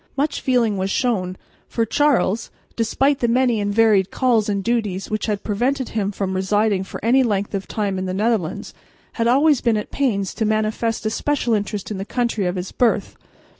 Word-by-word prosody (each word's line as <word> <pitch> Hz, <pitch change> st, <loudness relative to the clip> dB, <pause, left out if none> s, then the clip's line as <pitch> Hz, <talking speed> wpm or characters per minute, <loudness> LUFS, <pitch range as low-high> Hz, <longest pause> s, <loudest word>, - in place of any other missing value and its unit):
Much 290 Hz, +3 st, 0 dB
feeling 235 Hz, -6 st, +1 dB
was 190 Hz, +1 st, -1 dB
shown, 190 Hz, -6 st, -1 dB, 0.3 s
for 230 Hz, -, -1 dB
Charles, 235 Hz, -4 st, +1 dB, 0.3 s
despite 270 Hz, +5 st, +1 dB
the 240 Hz, -, +1 dB
many 240 Hz, -2 st, +2 dB
and 205 Hz, 0 st, -1 dB
varied 210 Hz, -3 st, +3 dB
calls 235 Hz, -5 st, +1 dB
and 200 Hz, -1 st, -1 dB
duties 215 Hz, -5 st, -1 dB
which 215 Hz, +1 st, -1 dB
had 210 Hz, -2 st, -2 dB
prevented 250 Hz, +5 st, -1 dB
him 205 Hz, -2 st, -1 dB
from 195 Hz, -1 st, -3 dB
residing 195 Hz, +1 st, +1 dB
for 190 Hz, -, -8 dB
any 255 Hz, +3 st, +5 dB
length 205 Hz, -5 st, -1 dB
of 195 Hz, -1 st, -3 dB
time 200 Hz, -3 st, -2 dB
in 185 Hz, -, -3 dB
the 185 Hz, -, -2 dB
Netherlands, 210 Hz, -5 st, -1 dB, 0.4 s
had 230 Hz, -1 st, 0 dB
always 280 Hz, +3 st, +4 dB
been 230 Hz, -3 st, +2 dB
at 210 Hz, -, -5 dB
pains 200 Hz, -9 st, 0 dB
to 225 Hz, -, -2 dB
manifest 220 Hz, +1 st, -1 dB
a 215 Hz, -, 0 dB
special 255 Hz, -1 st, 0 dB
interest 205 Hz, -1 st, -2 dB
in 200 Hz, -, -4 dB
the -, -, -2 dB
country 230 Hz, -3 st, -1 dB
of 180 Hz, -, -2 dB
his 185 Hz, 0 st, -4 dB
birth. 245 Hz, -2 st, +1 dB
215 Hz, 195 wpm, -21 LUFS, 200-240 Hz, 0.4 s, any